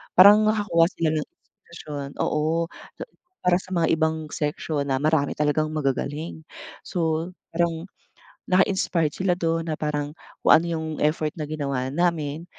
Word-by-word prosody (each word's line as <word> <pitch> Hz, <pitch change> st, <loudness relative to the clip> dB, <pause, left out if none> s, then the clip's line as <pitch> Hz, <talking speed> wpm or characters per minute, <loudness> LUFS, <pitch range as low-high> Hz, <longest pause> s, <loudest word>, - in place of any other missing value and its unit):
parang 210 Hz, +3 st, +8 dB
nakakuha 205 Hz, -6 st, +3 dB
sila 165 Hz, -4 st, -1 dB
ng 150 Hz, -, -4 dB
inspirasyon. 145 Hz, -2 st, -10 dB, 0.2 s
Oo, 160 Hz, +2 st, 0 dB, 0.7 s
para 180 Hz, 0 st, +3 dB
sa 185 Hz, 0 st, -6 dB
mga 170 Hz, -1 st, +2 dB
ibang 160 Hz, -1 st, 0 dB
section 150 Hz, -2 st, -2 dB
na 135 Hz, -, +1 dB
marami 155 Hz, -2 st, +2 dB
talagang 150 Hz, +1 st, +1 dB
magagaling. 150 Hz, +2 st, -3 dB, 0.4 s
So 165 Hz, -1 st, -1 dB, 0.2 s
parang 165 Hz, -1 st, 0 dB, 0.6 s
na-inspired 185 Hz, -4 st, +2 dB
sila 185 Hz, -1 st, +1 dB
dun 165 Hz, -2 st, -1 dB
na 155 Hz, -, 0 dB
parang 150 Hz, -1 st, -2 dB, 0.3 s
kung -, -, +8 dB
ano 165 Hz, -, +5 dB
yung 160 Hz, -1 st, -2 dB
effort 150 Hz, 0 st, +1 dB
na 155 Hz, -2 st, -6 dB
ginawa 140 Hz, -4 st, -2 dB
namin, 160 Hz, 0 st, -1 dB
160 Hz, 140 wpm, -24 LUFS, 150-170 Hz, 0.7 s, parang